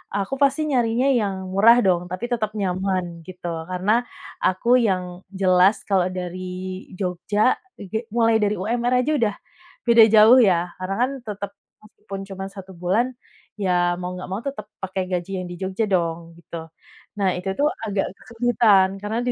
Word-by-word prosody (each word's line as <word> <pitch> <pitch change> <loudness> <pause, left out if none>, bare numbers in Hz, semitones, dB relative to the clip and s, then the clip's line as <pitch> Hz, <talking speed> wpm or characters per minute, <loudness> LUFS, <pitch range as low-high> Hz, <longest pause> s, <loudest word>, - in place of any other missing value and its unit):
aku 200 +5 -2
pasti 280 +2 +3
nyarinya 240 +1 +2
yang 200 -2 -1 0.2
murah 230 +5 +6
dong 180 -2 +1
tapi 220 +8 -5
tetep 215 -3 -1
nyaman 185 -1 -1 0.2
gitu 180 -1 -8 0.2
karena 185 +3 -1 0.5
aku 235 +7 +3
yang 185 -2 0 0.2
jelas 190 +1 +3
kalau 190 -3 +1
dari 180 0 -5 0.6
Jogja 195 +5 0 0.2
ege 220 +4 -5
mulai 225 -1 +4
dari 210 0 +1
UMR 240 +5 -1
aja 305 - 0
udah, 210 -3 +1 0.5
beda 230 -1 +8
jauh 225 +4 +8
ya 180 -5 +3
karena 190 +1 -3
kan 255 +2 +2 0.2
tetep, 200 -1 -5 0.3
meskipun 200 -2 -9
cuma 195 0 -6
1 190 -1 -10
bulan, 215 +9 0 0.4
ya 175 -2 +2
mau 180 0 -4
nggak 180 0 -7
mau 200 +4 -3
tetep 210 -7 -5 0.2
pakai 190 0 -2
gaji 180 +1 -2
yang - - -7
di - - -6
Jogja 190 +4 -1
dong 170 -3 0 0.2
gitu. 165 -1 -8 0.5
Nah, 195 -2 +2
itu 190 +1 -4
tuh 295 - +4 0.2
agak 200 -1 0
kesulitan 225 -5 +3
karena 215 +3 -2
di - - +2
195 Hz, 160 wpm, -22 LUFS, 185-225 Hz, 0.6 s, beda